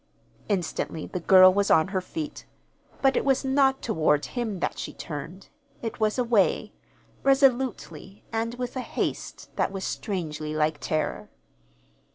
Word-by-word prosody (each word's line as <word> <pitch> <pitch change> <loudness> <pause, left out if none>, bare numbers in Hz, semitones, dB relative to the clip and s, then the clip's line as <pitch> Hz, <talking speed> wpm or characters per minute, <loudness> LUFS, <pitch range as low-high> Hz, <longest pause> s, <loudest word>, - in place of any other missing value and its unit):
Instantly 175 -4 -2
the 180 - -4
girl 185 +1 +7
was 200 +1 +1
on 160 +3 +4
her 190 -1 -1
feet. 305 - -6 0.6
But 270 0 +4
it - - +1
was 270 0 +1
not 265 0 +2
toward 155 -8 +2
him 225 -6 -3
that - - -2
she - - -5
turned. 165 +4 -8 0.3
It 225 0 -4
was 215 +1 +1
away 230 -5 +2 0.5
resolutely, 245 - +1
and 230 +1 -1
with 250 0 -5
a - - -2
haste - - -4
that - - +1
was 195 -1 -5
strangely 155 -8 -3
like 155 0 +1
terror. 155 - -2
200 Hz, 145 wpm, -26 LUFS, 160-250 Hz, 0.6 s, girl